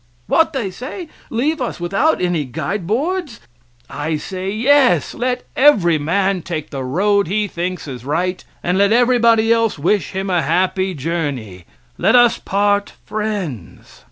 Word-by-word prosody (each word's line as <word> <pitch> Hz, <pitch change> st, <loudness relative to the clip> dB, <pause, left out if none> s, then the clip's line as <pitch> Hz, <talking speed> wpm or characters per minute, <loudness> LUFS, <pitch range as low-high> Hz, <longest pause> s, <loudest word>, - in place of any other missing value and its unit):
"What," 325 Hz, -, +2 dB
they 230 Hz, -9 st, -2 dB
say, 305 Hz, -, -7 dB, 0.2 s
"leave 285 Hz, +6 st, -1 dB
us 245 Hz, -, -3 dB
without 195 Hz, -, +1 dB
any 175 Hz, -4 st, 0 dB
guide 160 Hz, -, -4 dB
boards?" 295 Hz, -, -2 dB, 0.5 s
I 155 Hz, +1 st, -3 dB
say: 185 Hz, +4 st, -5 dB
"Yes. 240 Hz, -, +3 dB
Let 250 Hz, +1 st, -2 dB
every 190 Hz, -, +4 dB
man 190 Hz, +5 st, 0 dB
take 155 Hz, -3 st, -5 dB
the 135 Hz, -2 st, -4 dB
road 200 Hz, +9 st, +1 dB
he 210 Hz, +3 st, 0 dB
thinks 180 Hz, -2 st, -4 dB
is 125 Hz, -4 st, -7 dB
right; 175 Hz, +6 st, -2 dB, 0.2 s
and 180 Hz, +2 st, 0 dB
let 200 Hz, +1 st, +4 dB
everybody 230 Hz, -2 st, +4 dB
else 230 Hz, -4 st, +1 dB
wish 170 Hz, +4 st, 0 dB
him 190 Hz, +1 st, -3 dB
a 180 Hz, -3 st, +1 dB
happy 185 Hz, +4 st, 0 dB
journey; 135 Hz, -, -4 dB, 0.3 s
let 195 Hz, +7 st, +3 dB
us 240 Hz, -1 st, +5 dB
part 205 Hz, +1 st, 0 dB
friends." 205 Hz, -, -5 dB
195 Hz, 150 wpm, -18 LUFS, 165-230 Hz, 0.5 s, us